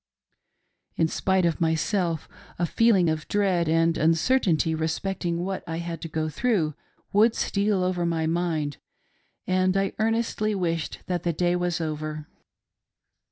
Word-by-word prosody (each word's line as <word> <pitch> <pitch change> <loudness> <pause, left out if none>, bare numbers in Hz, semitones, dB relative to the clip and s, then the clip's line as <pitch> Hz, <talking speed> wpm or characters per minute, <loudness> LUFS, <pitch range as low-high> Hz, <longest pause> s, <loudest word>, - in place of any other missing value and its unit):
In 165 - +2
spite 190 +2 +1
of 170 +1 0
myself, 165 0 0 0.3
a 175 - +1
feeling 200 -1 +3
of 155 -1 -1
dread 185 -5 +1
and 165 +1 +2
uncertainty 165 0 +2
respecting 170 +2 -2
what 190 0 -3
I 165 -1 -3
had 170 0 -5
to - - -4
go 155 0 -2
through 170 -3 0 0.4
Would 220 +3 +4
steal 200 -2 +1
over 180 -1 0
my 165 -1 0
mind, 160 -3 -1 0.7
aind 185 +1 +2
I 195 0 0
earnestly 220 -1 0
wished 170 -4 -2
that 180 -2 -2
the 170 0 -1
day 175 +2 +1
was 175 -1 -1
over. 155 -1 -4
170 Hz, 140 wpm, -25 LUFS, 160-190 Hz, 0.7 s, Would